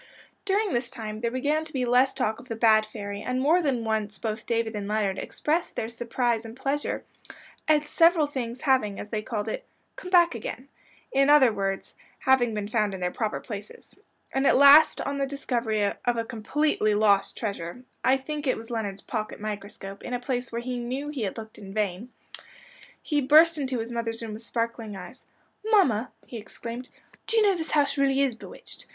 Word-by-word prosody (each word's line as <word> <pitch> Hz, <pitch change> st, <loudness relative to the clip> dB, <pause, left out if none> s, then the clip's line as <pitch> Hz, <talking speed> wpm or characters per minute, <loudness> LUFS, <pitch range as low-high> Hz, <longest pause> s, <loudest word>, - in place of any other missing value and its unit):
During 405 Hz, 0 st, +1 dB
this 240 Hz, 0 st, -1 dB
time 215 Hz, -1 st, -6 dB
there 235 Hz, -, +1 dB
began 290 Hz, +6 st, 0 dB
to 315 Hz, -, -10 dB
be 255 Hz, -2 st, 0 dB
less 250 Hz, +2 st, +3 dB
talk 220 Hz, +1 st, -1 dB
of 250 Hz, -, -14 dB
"the 225 Hz, -, -2 dB
bad 220 Hz, -1 st, +4 dB
fairy," 205 Hz, -2 st, -6 dB
and 250 Hz, 0 st, -2 dB
more 315 Hz, +7 st, +4 dB
than 265 Hz, -7 st, 0 dB
once 215 Hz, -2 st, -2 dB
both 215 Hz, 0 st, -4 dB
David 230 Hz, -1 st, 0 dB
and 205 Hz, -2 st, -4 dB
Leonard 205 Hz, -2 st, 0 dB
expressed 320 Hz, +3 st, -2 dB
their 220 Hz, -, -2 dB
surprise 235 Hz, 0 st, -1 dB
and 225 Hz, +1 st, -10 dB
pleasure 280 Hz, +2 st, -2 dB, 0.6 s
at 305 Hz, -1 st, +4 dB
several 330 Hz, +1 st, +4 dB
things 255 Hz, -4 st, -5 dB
having, 255 Hz, -8 st, +2 dB
as 205 Hz, -, -7 dB
they 215 Hz, -1 st, -2 dB
called 215 Hz, -1 st, -4 dB
it, 360 Hz, -, -3 dB, 0.3 s
"come 365 Hz, -, -8 dB
back 345 Hz, -3 st, +5 dB
again;" 240 Hz, +3 st, -6 dB, 0.4 s
in 275 Hz, +1 st, +3 dB
other 270 Hz, -6 st, +6 dB
words, 195 Hz, -1 st, -3 dB, 0.2 s
having 245 Hz, -4 st, +3 dB
been 205 Hz, -1 st, -3 dB
found 210 Hz, -2 st, 0 dB
in -, -, -7 dB
their 180 Hz, 0 st, -1 dB
proper 220 Hz, +1 st, -2 dB
places. 205 Hz, -2 st, -9 dB, 0.4 s
And 270 Hz, +1 st, +2 dB
at -, -, +5 dB
last 285 Hz, +3 st, +8 dB
on 280 Hz, 0 st, -3 dB
the 275 Hz, -, 0 dB
discovery 240 Hz, -6 st, -1 dB
of 235 Hz, +4 st, -1 dB
a 230 Hz, -, -1 dB
"completely 225 Hz, -1 st, 0 dB
lost" 200 Hz, -2 st, +3 dB
treasure 200 Hz, 0 st, -4 dB, 0.2 s
I 260 Hz, +1 st, +4 dB
think 295 Hz, +2 st, -5 dB
it 255 Hz, -, +2 dB
was 225 Hz, +1 st, -9 dB
Leonard's 205 Hz, -4 st, -3 dB
pocket 215 Hz, -3 st, -4 dB
microscope 200 Hz, -2 st, -6 dB
in 245 Hz, -, -4 dB
a -, -, -2 dB
place 245 Hz, -1 st, -3 dB
where 235 Hz, 0 st, -3 dB
he 250 Hz, 0 st, -3 dB
"knew" 260 Hz, +5 st, -4 dB
he 290 Hz, -4 st, -4 dB
had 200 Hz, 0 st, -3 dB
looked 220 Hz, -1 st, -9 dB
in 195 Hz, -1 st, -10 dB
vain, 210 Hz, +3 st, -2 dB, 0.9 s
he 295 Hz, -2 st, +1 dB
burst 310 Hz, +4 st, +6 dB
into 265 Hz, -2 st, -1 dB
his 230 Hz, +1 st, -4 dB
mother's 230 Hz, -1 st, -3 dB
room 220 Hz, -2 st, -5 dB
with 215 Hz, -, -8 dB
sparkling 230 Hz, -2 st, -3 dB
eyes. 195 Hz, +7 st, -10 dB, 0.4 s
"Mamma," 325 Hz, -, +3 dB, 0.2 s
he 240 Hz, -, -8 dB
exclaimed, 235 Hz, +3 st, -7 dB, 0.4 s
"do 455 Hz, -, +1 dB
you 440 Hz, -, +6 dB
know 405 Hz, -2 st, +4 dB
this 320 Hz, -3 st, -4 dB
house 290 Hz, -1 st, +2 dB
really 275 Hz, 0 st, +3 dB
is 265 Hz, -3 st, +1 dB
bewitched? 225 Hz, -, -12 dB
235 Hz, 200 wpm, -26 LUFS, 215-275 Hz, 0.9 s, last